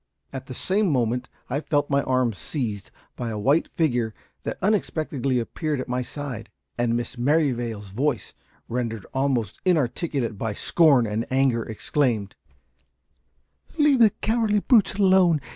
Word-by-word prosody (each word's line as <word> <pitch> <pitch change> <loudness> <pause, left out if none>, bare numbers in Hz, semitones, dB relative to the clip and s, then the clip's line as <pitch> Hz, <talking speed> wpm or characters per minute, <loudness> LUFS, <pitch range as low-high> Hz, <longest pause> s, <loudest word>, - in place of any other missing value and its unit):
At 130 -1 -6
the 130 - -7
same 200 - +1
moment 125 -2 0 0.2
I 135 +3 -1
felt 145 -1 0
my 140 0 +3
arm 130 -3 +1
seized 105 -2 -4 0.3
by 120 -2 -4
a 110 - -4
white 140 +10 +2
figure 120 -9 0 0.3
that - - -4
unexpectedly 155 - 0
appeared 145 +5 -2
at 130 - -4
my 125 0 -1
side, 125 -4 -6 0.3
and 120 -1 +1
Miss 120 +1 -5
Merrivale's 120 -7 0
voice, 125 +2 -2 0.3
rendered 115 -3 -3
almost 130 -7 -1
inarticulate 140 - 0
by 110 -2 -2
scorn 140 -2 +4
and 110 +2 -2
anger, 130 -3 +2
exclaimed 110 -2 -1 1.4
"Leave 295 -4 +4
the 225 -2 +7
cowardly 220 0 0
brutes 220 -5 +4
alone. 190 -5 +4
130 Hz, 140 wpm, -24 LUFS, 115-155 Hz, 1.4 s, the